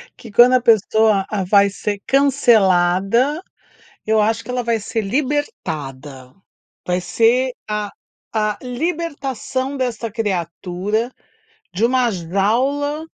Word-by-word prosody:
que 230 -4 -13
quando 245 +4 +6
a 255 - +4
pessoa 220 -3 +3
a 200 -3 -2
vai 200 +1 +4
ser 205 +1 -4
cancelada, 235 - +3 0.6
eu 220 0 +3
acho 225 +1 0
que 250 - -8
ela 250 0 -1
vai 230 -1 0
ser 220 +2 -3
libertada, 155 - -4 0.5
vai 180 0 0
ser 245 +7 +2 0.2
a 210 -1 -3 0.4
a 215 -1 0
libertação 275 -2 -3
desta 240 -3 -2
criatura, 195 +2 -2 0.6
de 210 +6 0
uma 250 0 +2
jaula 240 - -1
225 Hz, 115 wpm, -19 LUFS, 195-255 Hz, 0.6 s, quando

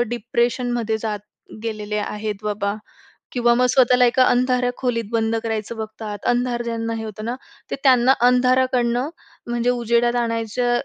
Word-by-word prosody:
डिप्रेशनमध्ये 240 -1 -1
जात 210 -1 -3 0.4
गेलेले 215 -2 -3
आहेत 210 0 -3
बाबा. 205 -1 -1 0.6
किंवा 240 -1 +3
मग 250 +1 +3
स्वतःला 250 -1 +5
एका 255 +2 +4
अंधाऱ्या 250 0 +2
खोलीत 235 -3 -1
बंद 225 0 +1
करायचं 225 0 -3
बघतात. 215 -1 -6
अंधार 245 0 +1
ज्यांना 230 -1 -3
हे 220 - -5
होतं 215 0 -7
ना. 240 +2 -2 0.4
ते - - 0
त्यांना 260 -1 +5
अंधाराकडनं 250 +1 +2 0.4
म्हणजे 240 0 0
उजेडात 240 0 +1
आणायच्या 230 +1 -1
235 Hz, 140 wpm, -21 LUFS, 220-245 Hz, 0.6 s, स्वतःला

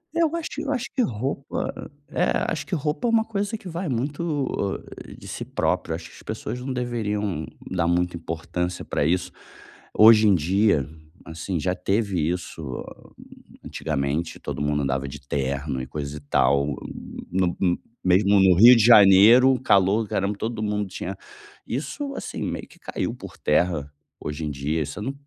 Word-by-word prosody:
Eu 335 -1 +2
acho 335 -2 -3
eu 290 -2 -3
acho 260 -2 -2
que 265 - +2
roupa, 135 - -3 0.2
é, - - +1 0.2
acho - - -3
que - - -1
roupa, 150 - -1
é - - +2
uma 225 -1 +3
coisa 205 0 -2
que 195 - -12
vai 170 0 -4
muito 140 - -2 0.4
de - - -12
si - - -5
próprio, 80 - -1
acho 80 -1 -8
que - - -16
as - - -14
pessoas, 120 +3 -5
não 130 +2 -5
deveriam 105 -8 -2 0.2
dar 90 -3 0
muita 90 +1 +1
importância 85 +2 -4
pra - - -1
isso. 85 +4 0 0.7
Hoje 110 0 +8
em 100 - +5
dia, 90 -2 +2 0.4
assim, 80 +2 -4
já 90 +3 0
teve 95 -5 0
isso 80 -7 -5 0.8
antigamente, 75 +2 -2
todo - - -5
mundo 75 0 0
andava 65 0 -1
de 70 +1 -8
terno 70 0 -2
e 65 - -6
coisa 75 0 -5
e - - -7
tal, 70 0 +1 0.6
no 90 -1 0 0.5
mesmo 100 +2 +4
no 95 -2 +6
Rio 120 +7 +9
de 115 - +4
Janeiro, 115 +4 +7
calor 100 -1 +3
do 105 - -10
caramba, 100 +1 -1
todo 115 +1 -3
mundo 105 -1 -1
tinha 95 +1 -5 0.5
isso, 160 - -4
assim, - - -5
meio - - -4
que - - -19
caiu - - -4
por - - -10
terra 75 -2 +1 0.3
hoje 75 +2 -5
em 75 - -2
dia, 75 +3 -2
você 75 +8 -7
não 130 +6 -3
95 Hz, 170 wpm, -24 LUFS, 80-120 Hz, 0.8 s, Rio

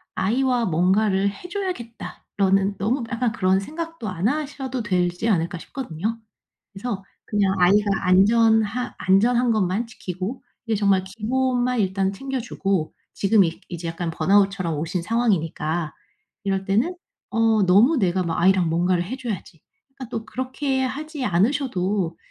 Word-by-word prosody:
'아이와 245 +4 +1
뭔가를 190 +3 +2
해 205 - -10
줘야겠다.'라는 225 - -2
너무 235 +7 0
약간 235 0 0
그런 190 -2 +2
생각도 325 +3 -6
안 185 0 -1
하셔도 275 -3 -3
되지 180 -1 0
않을까 175 -4 +1
싶거든요. 220 - -4 0.5
그래서 200 -1 -5 0.2
그냥 200 -2 +1
아이가 200 +4 +5 0.2
안전한 220 +4 +3
안전한 235 +6 +3
것만 215 +2 0
지키고 190 +2 -6 0.2
이게 225 -2 0
정말 200 -2 +2
기본만 245 +5 0
일단 190 0 0
챙겨주고 200 - -2 0.2
지금 200 +1 +4
이 165 -1 -3
이제 170 -1 -5
약간 165 +1 -3
번아웃처럼 195 -3 +2
오신 165 +4 -2
상황이니까. 170 -7 0 0.5
이럴 195 -1 0
때는 225 - +1 0.4
'어 225 -2 +3
너무 215 - +5
내가 185 -4 +1
막 165 -1 -2
아이랑 185 -2 +4
뭔가를 175 +2 +1
해 235 +9 -5
줘야지.' 205 - -6 0.4
그러니까 260 -4 -8
또 225 -1 -4
그렇게 260 +3 -2
하지 290 +1 -4
않으셔도 195 - 0
205 Hz, 325 characters per minute, -23 LUFS, 185-245 Hz, 0.5 s, 아이가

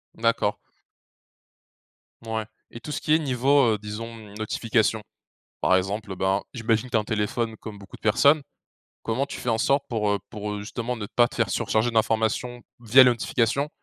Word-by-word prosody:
D'accord. 115 0 +1 1.7
Mouais 110 -1 -3 0.3
et 115 - -7
tout 150 - -8
ce - - -3
qui 155 - +2
est 160 - +5
niveau, 135 -3 +3
heu, - - -1
disons, 115 +2 -6 0.2
notifications. 110 0 0 0.6
Par 95 - +3
exemple, 100 +2 -2
ben, 95 +2 +1
j'imagine 115 -1 0
que 125 - -12
tu 115 - +3
as - - +3
un - - -8
téléphone, 110 +1 -2
comme 110 -1 -9
beaucoup 100 -1 -12
de - - -37
personnes. 140 +8 +4 0.6
Comment 125 +5 -1
tu - - -7
fais - - -5
en 115 - +1
sorte 140 +5 +2
pour, 110 -4 0
heu, 100 - +1
pour, 105 -2 -5
heu, 105 - -5
justement 120 +4 -4
ne 105 -2 -5
pas 120 +3 +3
te - - -11
faire - - +1
surcharger 110 +2 +1
d'informations 115 +2 0 0.2
via 120 +3 +7
les 125 - +6
notifications, 120 +4 0
115 Hz, 185 wpm, -25 LUFS, 105-125 Hz, 1.7 s, via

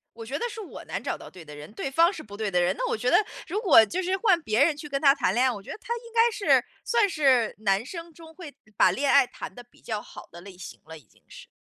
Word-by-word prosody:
我 230 -1 -9
觉 265 +5 -4
得 475 - -3
是 445 - -8
我 390 - -10
难 - - -5
找 - - -3
到 - - -12
对 180 -3 -13
的 150 -1 -12
人。 150 +4 -11
对 270 - -4
方 335 +6 +4
是 325 - -8
不 205 -4 -12
对 215 -2 -2
的 180 -1 +2
人， 180 +2 +1
那 - - -2
我 - - 0
觉 245 +3 -1
得， - - +5 0.3
如 385 +5 -2
果 320 - +7
就 350 - -3
是 370 +1 -1
换 390 -5 +3
别 220 -1 +2
人 315 0 +2
去 295 0 -8
跟 275 -1 -3
他 275 -2 +6
谈 185 - 0
恋 245 +4 +2
爱， 260 - +2
我 205 -4 -7
觉 - - -10
得 - - -7
他 470 +1 -5
应 470 -1 -11
该 465 0 +4
是 415 - +2 0.2
算 455 -4 +2
是 265 - +2
男 200 +1 0
生 335 +3 -9
中 320 0 -15
会 320 -4 -11 0.2
把 185 - +5
恋 275 +9 0
爱 280 - +6
谈 - - -9
得 245 - -11
比 240 - -26
较 215 -3 -4
好 - - -13
的 170 - -12
类 190 -1 -13
型 185 - -10
了 160 0 -10
已 150 - -18
经 - - -29
是。 - - -13
275 Hz, 325 characters per minute, -26 LUFS, 210-345 Hz, 0.3 s, 果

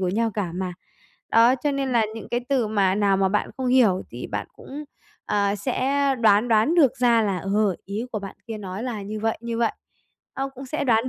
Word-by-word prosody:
của 185 - 0
nhau 225 +4 0
cả 195 -5 -2
mà. 180 0 -3 0.6
Đó, 230 +3 +5
cho 290 +3 -1
nên 275 -1 -1
là 230 -3 +3
những 225 - -8
cái 240 - -1
từ 260 -5 +2
mà 200 -3 +2
nào 200 -1 +2
mà 190 0 +2
bạn 210 +2 0
không 260 - -3
hiểu 235 -7 +4
thì - - -6
bạn - - -4
cũng, 295 +2 -8 0.4
à, 205 0 +1
sẽ 270 +5 0 0.2
đoán 215 +1 +4
đoán 225 +9 +3
được 275 -7 +4
ra 235 -2 +4
là, 195 -3 0
ờ, 195 +1 +1
ý 205 +4 -4
của 215 - -1
bạn 195 -1 -8
kia 220 -2 -5
nói 195 +2 -6
là 235 -5 -4
như 210 +2 -5
vậy, 225 0 -1
như 235 0 -4
vậy. 230 -1 +2 0.6
Ơ, 270 0 -2
cũng 265 +1 -9
sẽ 285 +2 -2
đoán 235 0 +2
225 Hz, 225 wpm, -24 LUFS, 200-250 Hz, 0.6 s, Đó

